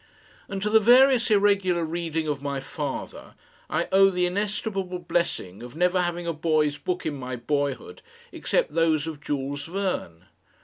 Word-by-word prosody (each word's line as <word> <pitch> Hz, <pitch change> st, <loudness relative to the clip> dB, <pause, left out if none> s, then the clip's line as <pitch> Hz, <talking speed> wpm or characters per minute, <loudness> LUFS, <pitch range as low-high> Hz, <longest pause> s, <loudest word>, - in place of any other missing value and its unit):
And 195 Hz, 0 st, -4 dB
to 210 Hz, -, +1 dB
the 220 Hz, -, +7 dB
various 250 Hz, +2 st, +5 dB
irregular 200 Hz, -4 st, +3 dB
reading 165 Hz, -1 st, -3 dB
of 145 Hz, -2 st, -2 dB
my 140 Hz, -1 st, -3 dB
father 140 Hz, +1 st, -6 dB, 0.3 s
I -, -, 0 dB
owe 195 Hz, 0 st, +6 dB
the 180 Hz, -1 st, 0 dB
inestimable 195 Hz, -1 st, -2 dB
blessing 170 Hz, -, -2 dB
of 120 Hz, +2 st, -10 dB
never 180 Hz, +2 st, +2 dB
having 175 Hz, 0 st, -2 dB
a 170 Hz, -, -1 dB
boy's 155 Hz, -2 st, +1 dB
book 180 Hz, 0 st, -3 dB
in 155 Hz, -, -1 dB
my 130 Hz, -2 st, -5 dB
boyhood 145 Hz, -, -3 dB, 0.3 s
except -, -, -1 dB
those 160 Hz, -2 st, +2 dB
of 155 Hz, -3 st, -6 dB
Jules 145 Hz, -1 st, -3 dB
Verne. 180 Hz, -, -3 dB
170 Hz, 160 wpm, -25 LUFS, 145-195 Hz, 0.3 s, the